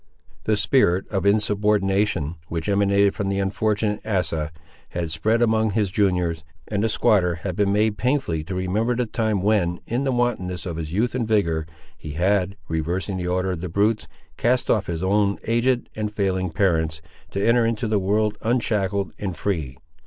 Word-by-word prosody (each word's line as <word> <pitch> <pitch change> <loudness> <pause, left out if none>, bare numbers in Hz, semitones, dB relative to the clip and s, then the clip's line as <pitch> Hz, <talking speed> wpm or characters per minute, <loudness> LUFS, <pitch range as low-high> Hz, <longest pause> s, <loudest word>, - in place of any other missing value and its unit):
The 110 - +2
spirit 105 -4 +2
of 95 -2 0
insubordination, 100 -5 +1
which 80 -1 -4
emanated 100 0 +3
from 100 -2 -2
the 100 - -1
unfortunate 105 +2 0
Asa, 80 -7 -1 0.4
had 85 -2 -3
spread 110 +9 +2
among 110 -1 +2
his 105 -3 +1
juniors; 90 -5 +1 0.2
and 105 -1 -1
the 115 - +2
squatter 95 -5 +2
had 90 -3 -2
been 100 0 +2
made 105 +1 +1
painfully 125 - 0
to 95 - -4
remember 105 +7 0
the 125 0 0
time 110 -3 -1
when, 95 -5 +2
in 120 +4 -1
the 135 - +1
wantonness 110 -8 -1
of 85 -3 -4
his 80 -2 -5
youth 110 +7 0
and 120 -3 -1
vigour, 85 -8 +1 0.3
he 75 - -8
had, 95 +3 +1
reversing 85 +5 -2
the 90 -1 -3
order 90 +1 0
of 85 -3 -4
the 90 - -4
brutes, 105 +5 +1 0.3
cast 125 +1 +2
off 105 -3 +1
his 85 0 -3
own 100 +1 +2
aged 120 +2 +1
and 105 -1 -2
failing 95 -3 0
parents, 80 -4 0 0.3
to 100 +2 -1
enter 120 0 +4
into 115 +1 0
the 105 -1 +2
world 105 +2 0
unshackled 105 -5 0
and 95 -5 -4
free. 75 -9 -2
100 Hz, 175 wpm, -23 LUFS, 90-110 Hz, 0.4 s, enter